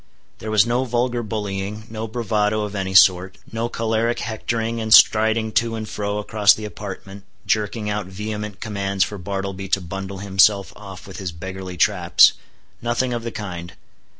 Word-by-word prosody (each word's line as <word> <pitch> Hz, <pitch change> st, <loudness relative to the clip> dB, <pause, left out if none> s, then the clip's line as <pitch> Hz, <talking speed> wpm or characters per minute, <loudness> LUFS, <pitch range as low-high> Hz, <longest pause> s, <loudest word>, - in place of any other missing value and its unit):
There 110 Hz, -, -6 dB
was 105 Hz, -2 st, +4 dB
no 120 Hz, +2 st, 0 dB
vulgar 120 Hz, -1 st, -1 dB
bullying, 105 Hz, -1 st, -4 dB
no 110 Hz, 0 st, -5 dB
bravado 110 Hz, -2 st, 0 dB
of 105 Hz, -1 st, -5 dB
any 95 Hz, -2 st, -3 dB
sort, 95 Hz, 0 st, +5 dB
no 115 Hz, +1 st, -2 dB
choleric 115 Hz, +1 st, 0 dB
hectoring, 115 Hz, 0 st, -3 dB
and 110 Hz, 0 st, -4 dB
striding 110 Hz, 0 st, +5 dB
to 115 Hz, +1 st, +1 dB
and 110 Hz, -1 st, -5 dB
fro 105 Hz, 0 st, -3 dB
across 105 Hz, -1 st, +4 dB
the 110 Hz, -, -7 dB
apartment, 100 Hz, -1 st, -8 dB, 0.2 s
jerking 105 Hz, 0 st, -1 dB
out 105 Hz, -2 st, -2 dB
vehement 105 Hz, +1 st, -6 dB
commands 100 Hz, -3 st, -1 dB
for 105 Hz, -, -5 dB
Bartleby 95 Hz, +1 st, -4 dB
to 100 Hz, -, +2 dB
bundle 95 Hz, +2 st, -6 dB
himself 100 Hz, +1 st, +3 dB
off 95 Hz, -3 st, -11 dB
with 95 Hz, -, -10 dB
his 95 Hz, -3 st, -4 dB
beggarly 95 Hz, +2 st, -7 dB
traps. 90 Hz, -2 st, +5 dB, 0.5 s
Nothing 120 Hz, +2 st, 0 dB
of 120 Hz, -, -2 dB
the 115 Hz, -, -4 dB
kind. 90 Hz, -6 st, -7 dB
105 Hz, 165 wpm, -21 LUFS, 95-110 Hz, 0.5 s, sort